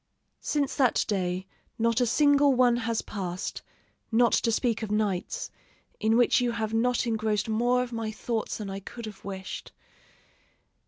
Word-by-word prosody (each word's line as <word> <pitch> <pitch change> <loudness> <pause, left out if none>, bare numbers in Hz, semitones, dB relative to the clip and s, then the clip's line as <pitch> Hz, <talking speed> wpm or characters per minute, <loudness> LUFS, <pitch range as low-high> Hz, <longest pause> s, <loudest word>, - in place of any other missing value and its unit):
Since 285 -2 -1
that 260 -4 +3
day 185 -2 -1 0.3
not 230 +1 +2
a 245 - +3
single 285 +2 +4
one 245 -1 +4
has 230 -1 -1
passed, 185 -3 -4 0.5
not 235 +1 +4
to 230 - +2
speak 230 -1 0
of 220 - -4
nights, 210 - -1 0.5
in 220 +2 +3
which 245 0 +4
you 240 -1 0
have 220 -1 -2
not 245 +2 +2
engrossed 220 -2 0
more 240 +3 +2
of 245 -1 -7
my 225 -1 -2
thoughts 225 0 -3
than 210 - -5
I 195 0 -4
could 230 +4 -8
have 210 -2 -10
wished.... 190 -1 -6
225 Hz, 160 wpm, -27 LUFS, 210-245 Hz, 0.5 s, single